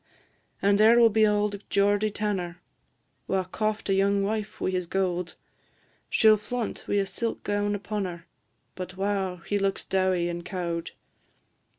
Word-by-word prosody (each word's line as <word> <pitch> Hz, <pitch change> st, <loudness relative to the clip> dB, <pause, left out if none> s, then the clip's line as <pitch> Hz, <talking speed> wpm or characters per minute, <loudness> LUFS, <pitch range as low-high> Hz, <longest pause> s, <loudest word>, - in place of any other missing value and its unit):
And 200 Hz, +1 st, +4 dB
there 225 Hz, +2 st, +7 dB
will 230 Hz, -1 st, +6 dB
be 215 Hz, 0 st, +4 dB
auld 205 Hz, -1 st, 0 dB
Geordie 205 Hz, +1 st, +2 dB
Tanner, 195 Hz, -4 st, -3 dB, 0.7 s
Wha 190 Hz, -1 st, +1 dB
coft 215 Hz, +3 st, -2 dB
a 195 Hz, -, +2 dB
young 200 Hz, +1 st, +2 dB
wife 215 Hz, +1 st, -3 dB
wi' -, -, 0 dB
his 180 Hz, -2 st, -2 dB
gowd; 180 Hz, -2 st, -1 dB, 0.8 s
She 220 Hz, -, +3 dB
'll 215 Hz, 0 st, +8 dB
flaunt 235 Hz, +2 st, -4 dB
wi' -, -, 0 dB
a 200 Hz, -1 st, +2 dB
silk 230 Hz, +3 st, -3 dB
gown 205 Hz, 0 st, 0 dB
upon 205 Hz, 0 st, -3 dB
her, 170 Hz, -2 st, -7 dB, 0.5 s
But, 185 Hz, 0 st, -7 dB
wow! 195 Hz, -2 st, -1 dB
he 205 Hz, -, 0 dB
looks 195 Hz, 0 st, -1 dB
dowie 185 Hz, -2 st, +1 dB
and 175 Hz, 0 st, -4 dB
cowed. 170 Hz, -2 st, -3 dB
200 Hz, 160 wpm, -27 LUFS, 185-210 Hz, 0.8 s, ll